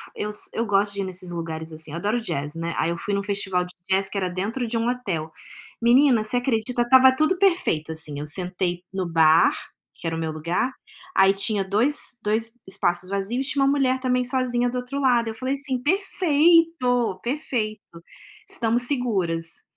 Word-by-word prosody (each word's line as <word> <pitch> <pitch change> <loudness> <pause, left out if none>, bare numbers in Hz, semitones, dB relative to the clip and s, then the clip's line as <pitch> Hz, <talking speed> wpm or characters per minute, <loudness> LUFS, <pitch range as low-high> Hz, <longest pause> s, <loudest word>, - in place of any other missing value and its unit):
eu 210 - -3 0.2
eu 230 - -1
gosto 200 0 +1
de 200 - -3
ir - - -1
nesses 185 -1 -4
lugares 160 -1 -5
assim, 155 -1 -5
adoro 205 +8 -1
jazz, 150 -9 -4
né. 165 0 -3
Aí 165 - +1
eu 170 - -2
fui 205 +4 -4
num 200 0 0
festival 190 -3 -1
de 180 - -13 0.2
jazz 190 0 +1
que 200 - -5
era 185 -2 -1
dentro 215 +7 -3
de 230 +1 -2
um 230 +1 -1
hotel. 175 -11 -3 0.5
Menina, 240 -1 +4
você 230 +3 +1
acredita, 245 -1 0
estava 260 +2 +6
tudo 310 +6 +2
perfeito 340 - +1
assim, 150 -2 -2
eu 150 - -5
sentei 180 +2 0
no 190 -2 -2
bar, 160 0 +5 0.4
que - - -13
era 165 - -1
o - - -4
meu 160 -1 -2
lugar, 170 +11 -2 0.4
aí 195 0 +6
tinha 200 0 0
dois 235 +6 0
dois 220 +2 0 0.2
espaços 175 -1 0
vazios 205 +7 -2
e - - -1
tinha 280 -1 +1
uma 275 - +3
mulher 260 -2 +1
também 250 -1 +1
sozinha 245 -1 +1
do 250 - -4
outro 250 +3 -4
lado, 240 -4 +2
eu - - -4
falei 255 +4 -2
assim: 270 -3 -4
“Perfeito, 330 - +2
perfeito, 240 -6 -2 0.7
estamos 235 +1 0
seguras.”. 190 - -1
215 Hz, 190 wpm, -23 LUFS, 180-255 Hz, 0.7 s, estava